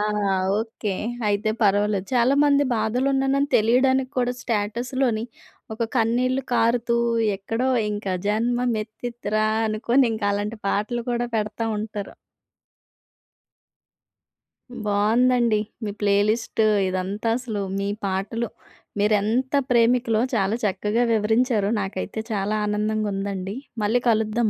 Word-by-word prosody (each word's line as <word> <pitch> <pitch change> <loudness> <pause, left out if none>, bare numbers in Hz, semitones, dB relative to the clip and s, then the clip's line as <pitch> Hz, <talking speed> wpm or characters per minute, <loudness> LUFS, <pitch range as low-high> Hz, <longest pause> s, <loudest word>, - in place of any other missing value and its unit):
ఆ! - - +1 0.6
ఓకే. 220 -3 -4 0.3
అయితే 205 +1 +1
పర్వాలేదు. 205 -1 +2
చాలామంది 280 +4 +4
బాధలో 225 +5 0
ఉన్నాయని 270 +1 +1
తెలియడానికి 255 +4 +3
కూడా 245 0 +1
స్టేటస్‌లోనే 235 +2 -1 0.5
ఒక 230 - -1
కన్నీళ్లు 250 +4 +1
కారుతూ, 235 +1 +2 0.4
ఎక్కడో 225 +6 -2 0.2
ఇంకా 205 -2 -3 0.2
జన్మమెత్తితిరా 225 -1 -1 0.2
అనుకుని, 235 +5 +2
ఇంకా 220 -2 -2
అలాంటి 210 +2 -3
పాటలు 220 +5 -1
కూడా 240 0 -1
పెడతా 215 +1 -2
ఉంటారు. 210 -1 -6 2.7
బావుందండి. 225 +2 +3 0.2
మీ 210 - -2
ప్లే 200 -1 +3
లిస్ట్ 225 0 -1 0.3
ఇదంతా. 190 +4 -2
అసలు 220 -5 -4 0.2
మీ 200 - -1 0.2
పాటలు 200 +5 -2 0.5
మీరెంత 215 +6 +1 0.2
ప్రేమికులో, 235 -1 +3
చాలా 200 +1 +1
చక్కగా 210 +4 0
వివరించారు. 220 0 +2
నాకైతే 195 +2 -4
చాలా 205 0 -1
ఆనందంగుందండి. 205 -2 -2 0.3
మళ్లీ 225 +4 +2
కలుద్దాం 220 0 +1
220 Hz, 100 wpm, -23 LUFS, 205-240 Hz, 2.7 s, చాలామంది